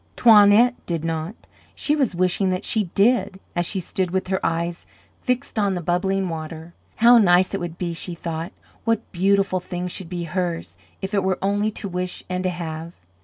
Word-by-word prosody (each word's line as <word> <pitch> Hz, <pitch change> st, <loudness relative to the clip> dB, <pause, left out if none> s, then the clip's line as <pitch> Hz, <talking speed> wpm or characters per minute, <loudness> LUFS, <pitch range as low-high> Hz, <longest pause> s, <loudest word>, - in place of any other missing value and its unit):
Toinette 220 Hz, +1 st, +7 dB
did 165 Hz, -2 st, -2 dB
not; 165 Hz, +4 st, -3 dB, 0.4 s
she 300 Hz, -, +1 dB
was 265 Hz, -11 st, 0 dB
wishing 185 Hz, +2 st, +1 dB
that 185 Hz, 0 st, -2 dB
she 215 Hz, -2 st, +1 dB
did, 205 Hz, -2 st, +2 dB, 0.2 s
as 175 Hz, -1 st, 0 dB
she 195 Hz, -, -1 dB
stood 185 Hz, +1 st, -2 dB
with 185 Hz, +1 st, -2 dB
her 190 Hz, -1 st, -1 dB
eyes 170 Hz, +1 st, -2 dB, 0.3 s
fixed 250 Hz, -2 st, -1 dB
on 200 Hz, -2 st, +1 dB
the -, -, -2 dB
bubbling 185 Hz, +3 st, 0 dB
water. 160 Hz, 0 st, -6 dB, 0.2 s
How 235 Hz, +1 st, +7 dB
nice 185 Hz, -2 st, +4 dB
it 195 Hz, -, -1 dB
would 175 Hz, -1 st, -5 dB
be! 175 Hz, -2 st, -3 dB
she 170 Hz, +1 st, -4 dB
thought. 165 Hz, +1 st, -5 dB, 0.3 s
What 230 Hz, -2 st, -1 dB
beautiful 195 Hz, +1 st, +2 dB
things 180 Hz, 0 st, -5 dB
should 175 Hz, -2 st, -6 dB
be 175 Hz, -1 st, -4 dB
hers, 175 Hz, 0 st, -3 dB, 0.3 s
if 190 Hz, +2 st, -4 dB
it 200 Hz, -2 st, +2 dB
were 190 Hz, -1 st, +1 dB
only 205 Hz, +2 st, +1 dB
to 205 Hz, -, -4 dB
wish 180 Hz, 0 st, -4 dB
and 180 Hz, 0 st, -2 dB
to 185 Hz, -, +1 dB
have. 165 Hz, -1 st, -5 dB
185 Hz, 190 wpm, -23 LUFS, 170-200 Hz, 0.4 s, Toinette